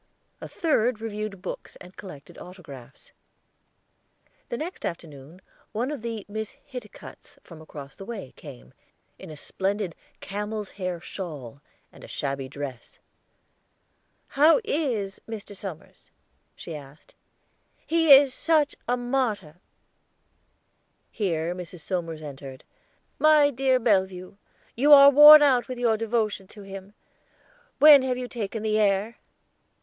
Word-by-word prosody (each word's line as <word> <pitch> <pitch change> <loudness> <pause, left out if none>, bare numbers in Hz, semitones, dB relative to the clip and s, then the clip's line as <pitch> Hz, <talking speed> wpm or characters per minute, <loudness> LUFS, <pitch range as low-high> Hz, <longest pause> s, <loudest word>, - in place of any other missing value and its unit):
A - - -7
third 250 -8 0
reviewed 215 -3 -6
books 185 - -7
and 180 +1 -14
collected 155 -8 -12
autographs. 140 -9 -13 1.4
The 235 - -3
next 345 +7 -7
afternoon 160 0 -8 0.3
one 245 +6 -2
of 290 -6 -6
the 225 -3 -5
Miss 220 +1 -6
Hiticutts 280 - -11
from 165 -2 -13
across 145 -3 -11
the - - -10
way 200 - -8
came, - - -13 0.5
in - - -11
a 155 - -10
splendid 195 +3 -3 0.3
camel's 210 +1 -5
hair 180 -3 -5
shawl 145 - -8 0.3
and - - -16
a - - -10
shabby 135 -2 -4
dress. 135 -3 -8 1.3
"How 305 - +5
is 245 - -2
Mr. 215 -2 -8
Somers?" 185 -5 -10 0.5
she 165 - -8
asked. 145 0 -14 0.7
"He 325 -2 +2
is 275 -1 +8
such 310 -2 +1
a 245 +1 +1
martyr." 240 - -2 1.5
Here 170 -5 -2
Mrs. 180 -1 -9
Somers 165 -2 -4
entered. 135 -2 -10 0.6
"My 305 -2 +5
dear 260 0 +1
Bellevue, 190 -5 -1 0.4
you 290 +5 +5
are 280 0 +9
worn 295 +2 +10
out 255 -4 +3
with 255 -1 -6
your 235 -2 +2
devotion 215 -3 -2
to 205 +1 -13
him; 195 +1 -10 0.8
when 290 0 +8
have 255 -1 -2
you 250 0 -5
taken 220 -2 -5
the 215 0 +1
air?" 205 +2 0
205 Hz, 125 wpm, -25 LUFS, 170-250 Hz, 1.5 s, worn